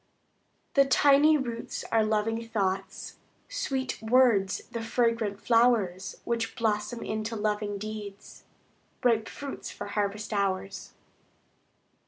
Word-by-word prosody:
The 275 -1 +5
tiny 285 +3 +5
roots 235 -4 -4
are 225 -1 +4
loving 225 +2 -1
thoughts; 195 -3 -2 0.3
Sweet 270 - -3
words, 220 -4 +3
the 230 - -4
fragrant 225 -3 0
flowers 220 -6 +2
Which 230 -1 -2
blossom 220 +1 -1
into 220 +1 -3
loving 210 -1 -1
deeds, 210 -1 -8 0.6
Ripe 230 -2 +2
fruits 280 -1 -7
for - - -7
harvest 205 +1 -2
hours. 195 -1 -2
220 Hz, 105 wpm, -28 LUFS, 205-235 Hz, 0.6 s, The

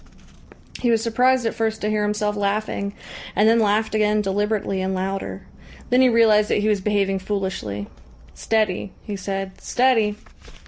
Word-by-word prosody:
He 245 - +1
was 230 -1 +3
surprised 250 +2 +2
at 225 - 0
first 220 -1 -1
to 210 - -1
hear 215 0 0
himself 210 0 -1
laughing, 200 0 -2 0.4
and 210 - +4
then 230 +1 +5
laughed 215 0 +1
again 215 0 +2
deliberately 200 0 -1
and 190 0 -1
louder. 195 +1 -4 0.5
Then 250 +1 +5
he 260 - +6
realised 220 -2 +4
that - - +2
he 210 - 0
was 210 -2 +1
behaving 195 -1 0
foolishly. 190 - -3 0.5
"Steady," 215 -4 -1
he 210 - -5
said. 195 0 -5
"Steady!" 240 -5 +2
210 Hz, 155 wpm, -22 LUFS, 195-220 Hz, 0.5 s, he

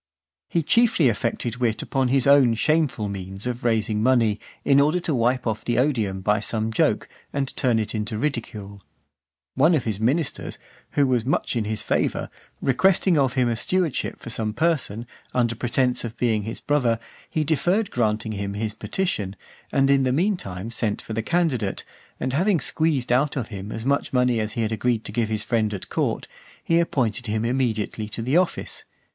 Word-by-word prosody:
He 170 - +1
chiefly 220 - +4
affected 115 +1 -2
wit 120 -3 0
upon 135 -1 0
his 130 0 +2
own 140 -4 +6
shameful 150 -5 +1
means 95 +1 -6
of 125 +1 -3
raising 110 -2 +1
money, 115 -4 +3 0.3
in 140 0 +5
order 150 +5 +3
to 165 - -1
wipe 125 0 +1
off 110 -2 -2
the 120 -1 -1
odium 115 -8 +1
by 105 +2 +2
some 110 +1 -2
joke, - - +1 0.2
and 140 -1 -2
turn 125 -5 +2
it 110 -1 -2
into 105 -1 -3
ridicule. 110 -7 -4 0.7
One 155 +6 +4
of 140 - 0
his 105 -3 -2
ministers, 130 +7 -1 0.4
who 145 - +3
was 125 -3 +1
much 130 +1 0
in 115 -3 0
his 110 0 -2
favour, - - -1 0.3
requesting 180 +6 +3
of 135 -4 +2
him 130 -2 +2
a 120 - 0
stewardship 175 +5 -1
for 115 - -6
some 110 -1 -1
person, 140 -8 0 0.3
under 120 -2 +2
pretence 125 +2 0
of 115 -2 -4
his - - -38
being 110 -4 +1
his 115 - -5
brother, 125 -6 +2 0.3
he 155 - 0
deferred 175 - +1
granting 110 -2 0
him 100 -1 -4
his 110 0 -2
petition, 110 - -2 0.4
and 135 0 +3
in 140 -1 +4
the 130 -1 +1
meantime 125 - -1
sent 110 -3 -1
for 110 - -7
the 115 - -1
candidate, 130 - 0 0.4
and 130 0 -2
having 180 +4 +2
squeezed 145 -3 0
out 135 +4 +2
of 120 -5 -3
him 100 -1 -7
as 110 +1 -5
much 140 +1 +1
money 125 -2 +3
as 110 0 -2
he 115 - -1
had 110 - -1
agreed 115 +1 0
to - - -5
give 115 +1 0
to 110 - -3
his 105 -1 0
friend 110 -3 0
at 95 - -8
court, - - -1 0.4
he 165 0 +3
appointed 125 -8 0
him 110 +1 -1
immediately 115 -4 -1
to 115 +1 -5
the 130 +6 0
office. 180 0 0
120 Hz, 190 wpm, -24 LUFS, 110-140 Hz, 0.7 s, own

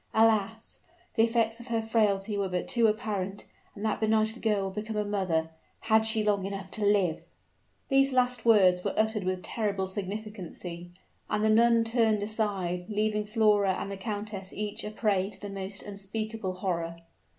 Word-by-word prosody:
Alas! 220 0 +2 0.3
the 225 - +2
effects 230 0 +2
of 235 - -11
her 230 -1 0
frailty 215 -2 +1
were 200 -1 -1
but 180 -1 -2
too 235 -2 +3
apparent; 205 -2 -2 0.3
and 205 - -5
that 215 - 0
benighted 220 +1 +1
girl 210 -3 +1
would 190 - -4
become 215 +2 -4
a 210 0 0
mother 180 -6 0 0.3
had 220 0 +3
she 220 -1 +2
long 205 -2 +1
enough 195 -1 -5
to 215 - -3
live!" 200 -5 +2 0.7
These 270 0 +4
last 250 -2 +1
words 185 -6 +5
were - - -2
uttered 220 -1 +1
with 185 0 -2
terrible 200 -4 -1
significancy; 190 -3 -6 0.4
and 210 0 0
the 220 - +4
nun 230 +1 +5
turned 225 -2 +2
aside, 195 -5 -1
leaving 210 0 0
Flora 210 -3 +3
and 200 - -4
the - - -3
countess 205 -1 -5
each 210 0 -4
a - - -4
prey 205 -3 0
to - - -11
the 205 -1 -7
most 195 0 -5
unspeakable 205 0 -4
horror. 170 -3 -3
210 Hz, 175 wpm, -29 LUFS, 195-220 Hz, 0.7 s, words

